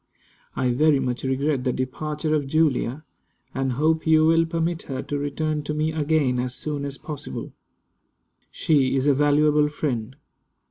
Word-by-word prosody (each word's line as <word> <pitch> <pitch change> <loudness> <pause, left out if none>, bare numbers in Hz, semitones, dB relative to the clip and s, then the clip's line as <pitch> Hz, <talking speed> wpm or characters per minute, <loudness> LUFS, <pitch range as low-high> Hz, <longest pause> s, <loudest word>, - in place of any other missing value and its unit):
I 125 -1 +1
very 150 +3 +3
much 125 -2 -2
regret 135 +1 0
the 125 - +1
departure 150 +5 -3
of 145 -3 0
Julia, 150 -2 +1 0.5
and 135 -1 -1
hope 160 +4 +1
you 155 0 +5
will 165 +1 +4
permit 165 0 -1
her 130 -1 -3
to 145 - -3
return 150 +2 -2
to 150 - -3
me 155 +1 0
again 150 -5 +1
as 125 0 -3
soon 145 -2 -4
as 140 -1 -6
possible. 150 -3 -7 1.0
She 135 -4 +1
is 135 0 +1
a 145 - +5
valuable 150 +1 +3
friend. 130 -5 -3
145 Hz, 155 wpm, -24 LUFS, 130-155 Hz, 1.0 s, you